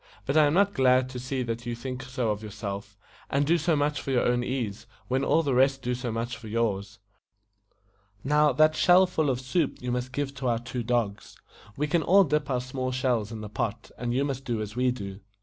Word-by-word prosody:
"But - - -1
I 155 -1 +6
am 145 - +1
not 200 +1 +3
glad 130 -1 +3
to 130 -1 -6
see 130 +1 -2
that 120 0 -4
you 120 - -2
think 125 +2 -5
so 125 -4 -2
of 105 0 -3
your 110 - -7
self, 100 -1 -6 0.3
and 140 +1 +1
do 170 +3 +3
so 165 +1 +2
much 145 0 0
for - - -7
your 130 -2 +2
own 120 0 +2
ease, 120 -5 -3 0.2
when 130 +2 0
all 165 - +3
the 140 -3 0
rest 135 +1 +3
do 125 - 0
so 125 -1 -3
much 115 +2 -3
for 115 - -11
yours. 105 -2 -1 1.3
Now, 150 +2 +4
that 155 +4 +4
shell 180 +3 +6
full 160 -5 0
of 125 -2 0
soup 135 +4 -1
you 125 0 -3
must 125 +1 -2
give 140 +1 -2
to 135 -2 -2
our 120 -1 +2
two 125 +2 -5
dogs. 115 -4 -2 0.4
We 150 - +1
can 160 +3 +1
all 195 +6 +6
dip 150 -3 0
our 125 -2 0
small 130 0 -3
shells 125 -4 0
in 110 -1 -6
the 105 - -6
pot, 105 +1 -4
and 120 -1 -3
you 135 +3 +1
must 135 -2 -3
do 120 -4 -2
as 105 0 -5
we 125 +1 +2
do." 100 -6 -5
125 Hz, 235 wpm, -27 LUFS, 115-140 Hz, 1.3 s, I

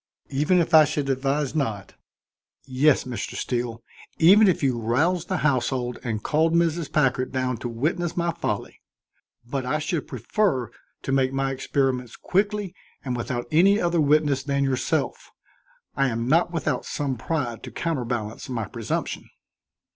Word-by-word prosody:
"Even 150 +7 +2
if 170 0 0
I 155 -1 +9
should 145 -2 -1
advise 135 +2 -1
not?" 110 -10 -2 0.7
"Yes, 135 +2 +3
Mr. 125 -2 -5
Steele; 120 -2 -3 0.3
even 200 +6 +7
if 180 -5 +1
you 130 -3 +1
roused 160 +10 +1
the 190 - -1
household 125 -3 0
and 110 -3 -3
called 160 +2 +2
Mrs. 170 -2 +1
Packard 130 -3 +1
down 130 -2 -1
to 120 +1 -5
witness 155 +9 -2
my 170 0 +1
folly. 170 - -4 0.6
But 130 +2 -3
I 130 +5 0
should 155 0 -2
prefer 135 - -1 0.3
to - - -3
make 135 -1 +2
my 135 0 0
experiments 130 -2 -1
quickly 205 0 -1 0.3
and 125 -2 -2
without 120 0 -3
any 195 +6 +5
other 170 -3 +1
witness 145 -2 +3
than 140 0 0
yourself. 135 -2 -1 0.7
I 135 0 +2
am 115 -1 -2
not 165 +5 +3
without 165 -3 -1
some 140 -3 -2
pride 125 -3 -3
to - - -8
counterbalance 120 -9 -3
my 115 -4 -2
presumption." 115 +1 -4
135 Hz, 150 wpm, -24 LUFS, 125-165 Hz, 0.7 s, I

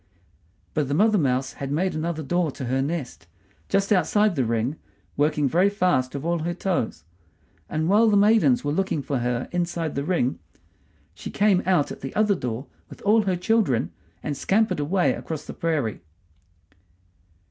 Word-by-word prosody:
But 150 -3 0
the 140 - -1
mother 215 +3 +4
mouse 130 -2 0
had 140 0 -6
made 180 +6 0
another 160 0 -3
door 175 +3 0
to 130 - -6
her 130 +2 0
nest, 140 - -4 0.4
just 195 +1 +2
outside 205 +1 +2
the 135 - +1
ring, 115 +5 -1 0.4
working 150 0 +1
very 180 +8 +3
fast 180 -11 0
with 140 +2 -5
all 170 0 0
her 170 +2 -3
toes; 170 - -2 0.7
and 160 +1 -1
while 215 +4 +5
the 205 - +4
maidens 225 +5 +4
were 145 - -1
looking 160 -3 -1
for 135 -2 -2
her 120 0 -1
inside 170 -3 -2
the 140 - -2
ring 155 -6 0 0.7
she - - -8
came 200 -3 +3
out 180 -6 +2
at - - -8
the 135 - -6
other 210 -1 +3
door 125 - -4 0.2
with - - -12
all 215 +2 +4
her 190 -2 +1
children 180 - +1 0.3
and 150 - -2
scampered 215 +5 +1
away 175 +5 +1
across 155 -2 -6
the - - -7
prairie. 150 -10 -2
165 Hz, 170 wpm, -24 LUFS, 135-195 Hz, 0.7 s, while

